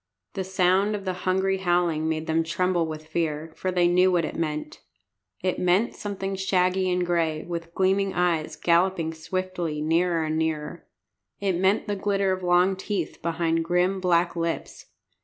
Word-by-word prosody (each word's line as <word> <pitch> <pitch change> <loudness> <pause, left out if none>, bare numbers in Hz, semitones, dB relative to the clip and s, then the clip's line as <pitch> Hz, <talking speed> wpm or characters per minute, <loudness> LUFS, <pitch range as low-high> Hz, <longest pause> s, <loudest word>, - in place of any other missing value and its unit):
The 190 - -2
sound 190 +2 +2
of 200 -1 -6
the 185 - -1 0.2
hungry 190 +1 +2
howling 175 -3 +1
made 160 0 -2
them 160 0 +1
tremble 170 0 0
with 155 0 -7
fear, 160 -1 -2
for 185 - -2
they 175 -1 +3
knew 180 +1 +4
what 175 -3 +2
it - - -6
meant. 155 -2 -3 0.6
It 185 -1 0
meant 180 +6 +2
something 195 -1 -4
shaggy 185 -1 +1
and 180 0 +1
gray, 165 -3 0
with 170 -1 -6
gleaming 190 0 +1
eyes, 165 -3 0
galloping 170 0 +1
swiftly 175 -1 -3
nearer 165 +2 +1
and 155 0 -1
nearer. 160 -2 -3 0.5
It 195 -2 0
meant 190 +4 +2
the 205 - -1
glitter 195 -1 0
of 185 0 -2
long 180 +1 +3
teeth 190 -3 -4
behind 165 0 0
grim 180 +3 +1
black 175 -1 +2
lips. 165 -1 -4
175 Hz, 165 wpm, -25 LUFS, 165-190 Hz, 0.6 s, knew